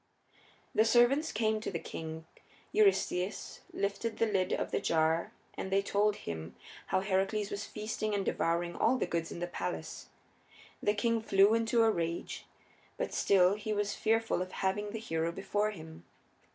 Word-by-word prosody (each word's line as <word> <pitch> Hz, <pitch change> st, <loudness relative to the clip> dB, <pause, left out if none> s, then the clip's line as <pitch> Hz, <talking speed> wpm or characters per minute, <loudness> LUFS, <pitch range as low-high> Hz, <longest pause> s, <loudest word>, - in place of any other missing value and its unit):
The 220 Hz, -, +5 dB
servants 240 Hz, +7 st, +4 dB
came 220 Hz, 0 st, +1 dB
to -, -, -3 dB
the 175 Hz, -, -2 dB
king; 160 Hz, 0 st, -7 dB, 0.5 s
Eurystheus 210 Hz, -, +1 dB
lifted 205 Hz, +3 st, -2 dB
the 230 Hz, -, +3 dB
lid 195 Hz, -4 st, 0 dB
of -, -, -1 dB
the -, -, +1 dB
jar 160 Hz, +1 st, +1 dB, 0.2 s
and 190 Hz, -, -5 dB
they 195 Hz, +1 st, +3 dB
told 205 Hz, +1 st, +2 dB
him 80 Hz, -, -6 dB, 0.3 s
how -, -, +1 dB
Heracles 195 Hz, +2 st, 0 dB
was 200 Hz, 0 st, -3 dB
feasting 215 Hz, 0 st, -3 dB
and 195 Hz, -1 st, -1 dB
devouring 170 Hz, +1 st, 0 dB
all 260 Hz, -, +3 dB
the -, -, 0 dB
goods 165 Hz, -1 st, -2 dB
in -, -, -6 dB
the 175 Hz, -, -2 dB
palace. 90 Hz, -, -5 dB, 0.7 s
The 205 Hz, -, +2 dB
king 230 Hz, +2 st, +1 dB
flew 200 Hz, -1 st, +5 dB
into 230 Hz, +1 st, +3 dB
a 225 Hz, -, +5 dB
rage, 170 Hz, -2 st, -3 dB, 0.5 s
but -, -, -3 dB
still 185 Hz, -1 st, +4 dB
he 215 Hz, +1 st, -3 dB
was 205 Hz, -1 st, 0 dB
fearful 225 Hz, -4 st, +1 dB
of 185 Hz, 0 st, -5 dB
having 200 Hz, +2 st, -1 dB
the 220 Hz, -, -5 dB
hero 165 Hz, -6 st, -1 dB
before 205 Hz, +3 st, -1 dB
him. 160 Hz, -5 st, -10 dB
200 Hz, 165 wpm, -32 LUFS, 175-220 Hz, 0.7 s, The